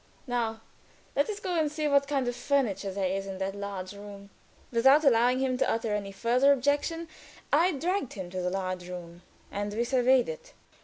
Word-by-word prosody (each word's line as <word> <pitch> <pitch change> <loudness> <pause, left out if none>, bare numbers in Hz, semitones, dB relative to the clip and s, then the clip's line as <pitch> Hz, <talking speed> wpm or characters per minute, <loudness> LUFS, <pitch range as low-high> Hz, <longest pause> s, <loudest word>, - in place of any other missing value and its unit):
"Now 230 -3 -2 0.5
let 285 - +2
us 415 -1 -3
go 370 -3 -3
and 305 -2 +1
see 305 0 -1
what 280 -1 +3
kind 275 -3 0
of 245 - -1
furniture 235 -9 0
there 195 0 -2
is 195 +1 -3
in 190 -1 -5
that 190 +1 -2
big 200 -2 -5
room." 200 -1 -11 0.4
Without 265 +6 +5
allowing 245 -1 +4
him 255 -1 0
to - - +2
utter 225 -1 0
any 200 -1 -3
further 245 +7 +3
objection, 285 +5 +1 0.5
I 340 +5 +4
dragged 335 0 -1
him 185 -3 -7
to 185 0 -3
the 180 - 0
large 185 -1 -3
room, 175 -1 -8 0.3
and 205 0 -3
we 235 - +1
surveyed 255 +1 +3
it. - - -8
240 Hz, 195 wpm, -29 LUFS, 195-280 Hz, 0.5 s, Without